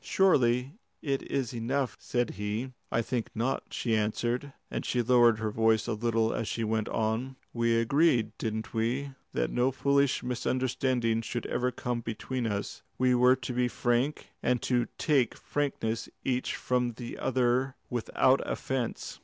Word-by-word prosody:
"Surely 130 -9 +3 0.3
it 140 -2 0
is 135 -3 -1
enough," 120 -2 -1
said 120 -2 -1
he. 105 +5 -3 0.2
"I 115 - +1
think 120 -1 -2
not," 120 +4 -1
she 115 -2 0
answered, 120 +5 -1 0.2
and - - -2
she 120 -1 0
lowered 120 -2 +5
her 110 -1 -2
voice 110 0 +3
a 120 - -1
little 115 0 +1
as 115 - -2
she 115 - -2
went 110 0 0
on. 115 +4 -1 0.2
"We 115 -1 +2
agreed, 115 -2 +3
didn't 110 0 -3
we, 120 +5 -1 0.2
that - - 0
no 125 +2 +2
foolish 140 0 +2
misunderstandings 125 -2 0
should 120 - -3
ever 125 0 0
come 120 -1 -3
between 120 +2 -3
us? 100 -2 -3 0.2
We 130 0 +3
were 125 +1 +6
to 125 -1 -5
be 125 0 +2
frank, 120 +4 0
and 125 - +2
to 120 -2 +1
take 140 -7 +2
frankness 125 -6 -2 0.2
each 125 -1 0
from 125 -1 0
the 120 +1 -7
other 130 +1 +1 0.2
without 125 +2 +2
offence. 130 -3 -3
120 Hz, 155 wpm, -29 LUFS, 115-130 Hz, 0.3 s, were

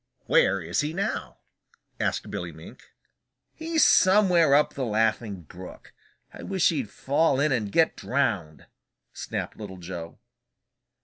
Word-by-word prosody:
"Where 95 0 +3
is 85 +1 -1
he 150 +2 -3
now?" 195 +3 -3 0.6
asked - - -2
Billy - - -5
Mink. - - -14 0.6
"He's 320 0 0
somewhere 180 -6 +5
up 150 - +2
the 135 - -4
Laughing 110 -4 -1
Brook. 90 +4 -12 0.4
I - - -10
wish 190 -3 +1
he'd 135 -10 -2
fall 140 0 +1
in 150 +1 +2
and 110 -6 -1
get 160 +6 +2
drowned!" 105 - -2 0.5
snapped - - -5
Little 100 -3 -8
Joe. 85 -2 -8
130 Hz, 130 wpm, -26 LUFS, 95-165 Hz, 0.6 s, somewhere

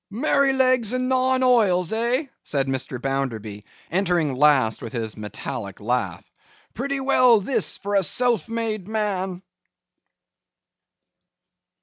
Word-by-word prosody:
'Merrylegs 255 -1 +2
and 255 0 -1
nine 260 0 +2
oils, 205 -8 +3
eh!' 240 +6 0 0.2
said 140 -2 -1
Mr. 130 -1 -3
Bounderby, 115 -6 -3 0.3
entering 175 -5 +1
last 130 -5 +3
with 115 - -7
his 110 -3 -3
metallic 105 0 -6
laugh. 100 -6 -2 0.5
'Pretty 275 +4 -3
well 255 -4 +4
this, 205 +7 -1
for 205 0 -5
a 200 - +4
self 235 +5 0
made 225 -4 -3
man! 195 -4 -2
195 Hz, 110 wpm, -23 LUFS, -, 0.5 s, well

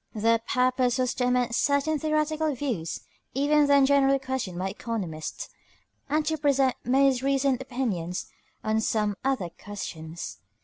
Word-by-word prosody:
Their 230 +1 +3
purpose 255 +1 +1
was 255 -1 +1
to 250 -1 0
amend 250 -1 +1
certain 285 +4 +2
theoretical 310 -1 0
views 235 - -3 0.3
even 290 +2 +3
then 280 -1 +6
generally 275 0 +4
questioned 260 -9 -4
by 190 +2 -1
economists, 185 -11 -5 0.6
and 305 +1 +1
to 315 0 -1
present 275 -3 +3
most 265 0 +3
recent 270 -1 +1
opinions 210 -9 -3 0.4
on 220 0 +1
some 210 -2 0
other 260 -10 0
questions. 170 - -6
255 Hz, 135 wpm, -27 LUFS, 220-280 Hz, 0.6 s, then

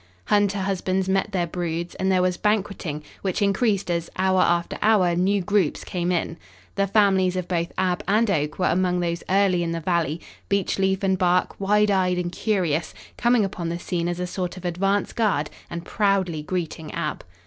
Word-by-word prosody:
Hunter 205 - +2
husbands 190 -1 -1
met 195 +2 +1
their 180 -3 0
broods, 170 0 -3
and 190 0 0
there 185 -1 +3
was 180 -1 +1
banqueting, 195 -7 -1 0.2
which 190 -2 -1
increased 200 -1 +1
as, 170 -1 -2
hour 185 0 +3
after 170 -1 +1
hour, 200 -5 +4
new 195 +3 +2
groups 200 -5 +1
came 175 -1 -2
in. 170 -1 -1 0.4
The 200 0 0
families 190 -3 +3
of 180 -1 -3
both 170 -1 -1
Ab 180 -1 0
and 215 +4 +3
Oak 150 -4 -1
were 185 - +1
among 180 0 +1
those 170 -1 -1
early 190 -2 +3
in 165 -1 -1
the 165 - -2
valley, 165 -2 0 0.3
Beechleaf 195 0 +1
and 190 -1 +1
Bark, 180 -1 +2
wide 210 +1 +3
eyed 185 -2 +2
and 175 -1 -2
curious, 175 -6 -1 0.2
coming 240 -3 +3
upon 175 -3 -4
the 170 - -2
scene 175 -1 -2
as 175 0 -3
a 180 - -1
sort 180 0 -4
of 185 - -9
advance 195 +4 0
guard 185 -10 0 0.2
and 170 0 -6
proudly 195 -6 +1
greeting 160 -1 -4
Ab. - - -3
185 Hz, 185 wpm, -24 LUFS, 175-195 Hz, 0.4 s, hour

